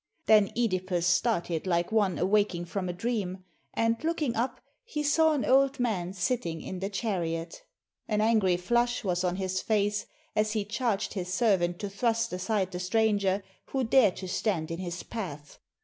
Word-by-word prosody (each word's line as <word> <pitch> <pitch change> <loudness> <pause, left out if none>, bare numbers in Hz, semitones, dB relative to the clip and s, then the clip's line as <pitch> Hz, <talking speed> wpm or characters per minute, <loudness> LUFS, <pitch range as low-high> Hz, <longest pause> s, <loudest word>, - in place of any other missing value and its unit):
Then 210 -2 +5
CEdipus 185 -6 0
started 180 -2 +1
like 170 +1 +1
one 205 -5 +2
awaking 190 -2 +1
from 185 +1 -3
a - - 0
dream, 185 -1 -3 0.3
and 230 +3 +1
looking 315 -7 0
up 245 +2 -1 0.2
he 310 -11 -3
saw 315 +2 +4
an 285 - 0
old 275 +1 +3
man 190 -7 -1
sitting 180 -4 -1
in 185 +3 -6
the 195 +1 -2
chariot. 170 -6 -3 0.5
An 210 -1 0
angry 215 -5 +3
flush 240 +7 +1
was 180 -2 0
on 180 -1 0
his 185 -1 -2
face, 205 -1 0 0.3
as 215 0 +1
he 215 -2 -1
charged 215 -1 -1
his 180 -3 -4
servant 185 -5 +2
to 205 - -3
thrust 230 +1 0
aside 190 +1 -1
the 180 - -4
stranger 200 0 +1 0.2
who 265 -1 -1
dared 225 -4 +4
to 185 - -6
stand 180 -4 -1
in 165 - -4
his 175 -1 -5
path. 150 -10 -7
200 Hz, 170 wpm, -28 LUFS, 180-230 Hz, 0.5 s, Then